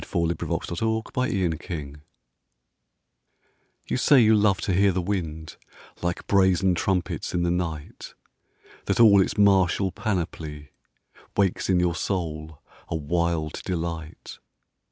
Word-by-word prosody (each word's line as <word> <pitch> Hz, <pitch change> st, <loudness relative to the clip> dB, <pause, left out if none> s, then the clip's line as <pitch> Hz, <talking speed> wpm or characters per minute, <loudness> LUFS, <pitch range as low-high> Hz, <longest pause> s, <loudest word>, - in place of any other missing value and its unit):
Aline 85 Hz, 0 st, -1 dB
Kilmer -, -, -2 dB
The 110 Hz, +5 st, -1 dB
Windy 100 Hz, -8 st, +1 dB
Night 75 Hz, -3 st, -5 dB, 1.9 s
YOU -, -, -1 dB
say 140 Hz, +2 st, +5 dB
you 110 Hz, -2 st, +5 dB
love 105 Hz, -3 st, +3 dB
to 95 Hz, -, -1 dB
hear 100 Hz, +2 st, +4 dB
the 95 Hz, -, -1 dB
wind 85 Hz, -4 st, -4 dB, 0.4 s
Like 85 Hz, 0 st, -3 dB
brazen 95 Hz, -1 st, +3 dB
trumpets 90 Hz, +1 st, -2 dB
in 85 Hz, -, +1 dB
the 85 Hz, -, +1 dB
night; 80 Hz, -4 st, -5 dB, 0.7 s
That -, -, -1 dB
all 105 Hz, -4 st, +7 dB
its -, -, -1 dB
martial 95 Hz, -1 st, +3 dB
panoply 80 Hz, -, -4 dB, 0.7 s
Wakes 95 Hz, -2 st, +1 dB
in 90 Hz, -2 st, +3 dB
your 90 Hz, -1 st, +1 dB
soul 80 Hz, -4 st, -4 dB, 0.3 s
a -, -, -2 dB
wild 80 Hz, 0 st, -1 dB
delight. 85 Hz, -3 st, -5 dB
90 Hz, 125 wpm, -25 LUFS, 80-100 Hz, 1.9 s, all